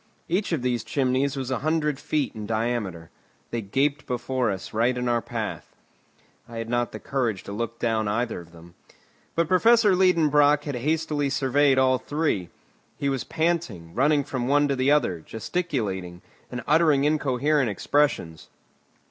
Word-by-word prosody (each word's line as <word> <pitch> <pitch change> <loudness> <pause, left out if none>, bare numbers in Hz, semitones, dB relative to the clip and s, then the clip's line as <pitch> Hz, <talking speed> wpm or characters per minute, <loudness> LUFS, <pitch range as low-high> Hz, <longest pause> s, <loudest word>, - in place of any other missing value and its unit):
Each 190 +4 -1
of 155 -7 -1
these 125 -2 0
chimneys 135 +1 0
was 130 -1 -3
a 130 - 0
hundred 150 -2 0
feet 150 -2 -1
in 105 -2 -7
diameter. 110 -7 -2 0.4
They 115 - -2
gaped 140 +8 -1
before 125 -1 -1
us 95 -2 -5
right 120 +3 +1
in 125 0 -2
our 120 -1 +1
path. - - -5 0.7
I 115 - -8
had 115 0 -4
not 120 0 0
the - - -7
courage 120 -8 -2
to - - -8
look 115 +2 -4
down 110 -3 0
either 115 +1 -1
of 85 0 -16
them. 85 0 -15 0.6
But 170 -1 +1
Professor 210 +2 +5
Liedenbrock 150 -5 +4
had 145 - -4
hastily 150 +2 -1
surveyed 135 0 +2
all 130 -1 +3
three; 145 - -1 0.5
he 140 - -1
was 135 -2 -1
panting, 160 - -2
running 145 +3 +3
from 130 -3 -3
one 145 +1 +3
to 140 - +1
the 130 +1 +1
other, 125 - +2
gesticulating, 105 - -4 0.3
and 125 -1 -5
uttering 150 -2 +4
incoherent 145 -2 +1
expressions. 100 - 0
130 Hz, 160 wpm, -25 LUFS, 115-150 Hz, 0.7 s, Professor